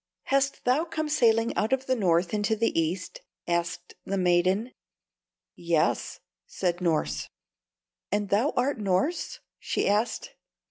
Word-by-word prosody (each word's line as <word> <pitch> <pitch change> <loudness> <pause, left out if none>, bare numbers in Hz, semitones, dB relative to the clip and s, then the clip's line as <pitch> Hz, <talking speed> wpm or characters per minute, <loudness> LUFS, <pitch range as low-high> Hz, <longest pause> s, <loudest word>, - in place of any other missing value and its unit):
"Hast 275 0 0
thou 255 +6 +3
come 320 -2 -3
sailing 230 -6 +3
out 220 - 0
of 265 0 +1
the 260 - +1
North 175 -4 +1
into 210 +1 +1
the 230 +1 +1
East?" 165 +3 -2 0.3
asked 170 0 -2
the 195 - -2
maiden. 185 +6 +2 0.8
"Yes," 170 -2 0 0.3
said 180 -1 -2
Norss. 155 - 0 0.8
"And 205 0 0
thou 220 +10 +2
art 255 0 +1
Norss?" 200 - -1 0.2
she - - -1
asked. 210 +4 0
205 Hz, 130 wpm, -27 LUFS, 175-250 Hz, 0.8 s, thou